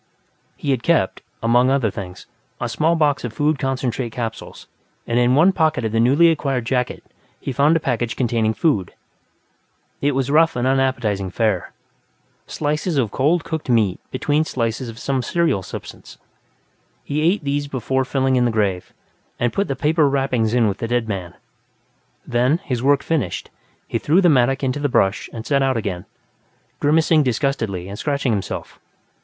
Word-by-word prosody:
He 140 - -2
had 130 -3 0
kept, 160 - +1 0.2
among 120 +2 +4
other 130 -6 +1
things, 90 -3 -8 0.3
a - - -2
small 165 +2 +1
box 145 -3 +1
of 120 -3 -4
food 150 +2 +1
concentrate 130 -2 -2
capsules, 115 -1 -6 0.4
and 120 +1 +1
in 125 +1 +3
one 165 +7 +5
pocket 160 -8 +1
of 110 - -1
the 115 - +1
newly 145 +8 +5
acquired 135 -6 -1
jacket 125 0 -1 0.4
he - - -4
found 145 +5 +3
a - - -1
package 120 -5 -2
containing 115 -3 0
food. 105 - 0 1.1
It 145 0 +2
was 135 0 0
rough 165 +2 +4
and 120 0 -1
unappetizing 130 -7 0
fare 105 -2 -1 0.8
slices 150 +2 -2
of 115 -7 +1
cold 160 +6 +1
cooked 160 -4 -5
meat 110 -6 +2
between 145 +4 0
slices 120 -3 -2
of 115 - -10
some 135 +2 -1
cereal 165 - 0
substance. - - -10 0.9
He 150 +2 -2
ate 170 +3 +2
these 145 0 -1
before 130 0 -1
filling 130 0 0
in 125 - +3
the - - +2
grave, 100 -5 -1 0.4
and 120 -1 0
put 200 - 0
the 135 - -2
paper 150 0 +2
wrappings 125 -5 0
in 120 -3 +3
with 100 -1 -2
the 115 - -2
dead 120 -1 0
man. 90 -5 -5 0.9
Then, 125 +6 +2
his 125 -3 -2
work 140 +1 +3
finished, 140 - -2 0.4
he - - -2
threw 160 +5 +3
the 180 -3 +5
mattock 135 -1 +2
into 135 +2 -1
the 145 0 0
brush 95 -4 +1
and 115 -1 -7
set 140 -2 +2
out 135 -2 +1
again, 95 -5 -4 0.7
grimacing 155 +1 +3
disgustedly 115 -8 -1
and 100 +2 -7
scratching 140 -4 0
himself. 100 -3 -4
130 Hz, 170 wpm, -21 LUFS, 115-145 Hz, 1.1 s, one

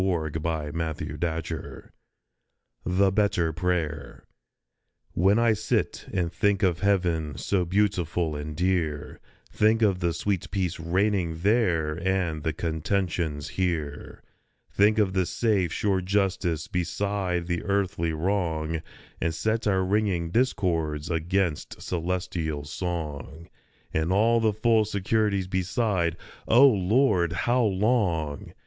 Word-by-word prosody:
THE 85 -5 0
BETTER 80 -2 -2
PRAYER 80 0 -4 0.9
57 90 0 -2
THE 100 0 +4
BETTER 95 -5 +1
PRAYER 80 -5 -2 0.9
WHEN 95 +4 +3
I 115 -1 +4
sit 110 +1 -1
and 90 -3 -1
think 100 +3 +1
of 90 -3 +2
heaven 85 -7 0
so 95 -3 0
beautiful 90 -4 0
and 75 +1 -5
dear, 85 -5 -1 0.3
Think 110 +1 +3
of 95 -4 +2
the 85 -1 +1
sweet 95 +2 -2
peace 90 -3 -2
reigning 85 -1 0
there 90 -8 +2
and 90 -4 0
the 80 - -1
conten 85 +4 -1
tions 75 -5 -3
here, 80 -6 -3 0.5
Think 105 +2 +3
of 100 -3 +2
the 95 -2 +1
safe, 100 -8 +1
sure 95 0 0
justice 95 -4 0
beside 90 -1 -1
the 85 -1 -2
earthly 95 -4 0
wrong, 80 -2 -1 0.4
And 80 -1 0
set 110 +4 -1
our 95 -2 +2
ringing 95 -4 0
discords 85 - 0
against 85 0 -1
celestial 85 -4 -3
song, 80 -1 -5 0.4
And 80 +2 0
all 115 +4 +4
the 110 -1 +2
full 110 +1 +3
securities 100 -1 0
beside 95 -2 0 0.2
" - - -25
O 125 +5 +7
Lord, 100 - +2
how 125 +1 +3
long 95 - 0
90 Hz, 125 wpm, -26 LUFS, 80-100 Hz, 0.9 s, O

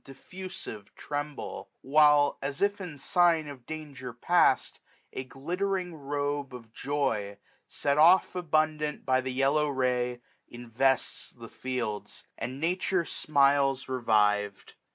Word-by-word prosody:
Diffusive, 135 - -9
tremble; 145 0 -5
while, 145 0 +4
as 140 0 -4
if 205 0 +1
in 170 -6 -7
sign 170 0 +2
Of 130 -4 -10
danger 145 -5 -7
past, 120 - +2 0.3
a 130 - -4
glittering 180 +7 -3
robe 145 -2 -3
of 115 -2 -12
joy 135 -9 -2 0.3
Set 140 +1 0
off 175 +4 +6
abundant 155 -3 0
by 130 -1 +3
the 130 0 -4
yellow 135 +3 +2
ray, 125 -2 0 0.3
1230 120 0 -10
Invests 130 +3 0
the 115 -2 -11
fields; 125 -5 -4
and 130 +2 -5
nature 180 +2 0
smiles 140 -3 +2
revived. 105 -5 +1
140 Hz, 120 wpm, -29 LUFS, 125-155 Hz, 0.3 s, off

